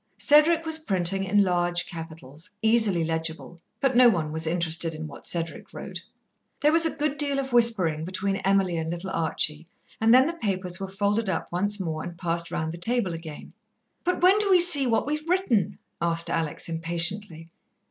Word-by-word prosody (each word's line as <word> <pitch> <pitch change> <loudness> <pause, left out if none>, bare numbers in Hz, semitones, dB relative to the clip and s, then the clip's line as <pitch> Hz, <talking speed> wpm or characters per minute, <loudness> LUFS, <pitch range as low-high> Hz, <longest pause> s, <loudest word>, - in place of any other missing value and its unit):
Cedric 315 +3 +4
was 320 0 +2
printing 195 - 0
in 205 +2 +2
large 175 -1 0
capitals, 160 -2 -10
easily 220 -6 +2
legible, 160 +1 -4 0.2
but 270 -2 0
no 245 0 +7
one 160 -8 -2
was 160 +1 -3
interested 165 -1 -1
in 160 +1 -7
what 150 - -9
Cedric 165 -1 -3
wrote. - - -8 0.6
There 300 - +3
was 330 +1 +3
a - - -6
good 295 -1 -2
deal 285 -2 +1
of 265 -2 -4
whispering 200 -10 +3
between 190 +3 -3
Emily 195 -3 0
and 160 0 -4
little 175 +3 -5
Archie, 160 -1 -1 0.3
and 225 +1 +3
then 255 +2 +6
the 330 - -2
papers 185 - -3
were 195 - -5
folded 205 +2 -1
up 185 - -4
once 205 +4 0
more 160 -4 -4
and 170 +1 -8
passed 170 0 -3
round 160 0 -3
the 170 - -9
table 225 -2 -1
again. 165 -2 -10 0.5
"But 360 -1 -2
when 380 +3 +5
do 415 -1 +1
we 370 -2 +5
see 325 -7 +8
what 230 -2 0
we've 305 +3 -4
written?" 305 - 0 0.2
asked 170 0 +1
Alex 160 -2 -3
impatiently. 165 +1 -3
185 Hz, 185 wpm, -25 LUFS, 165-245 Hz, 0.6 s, see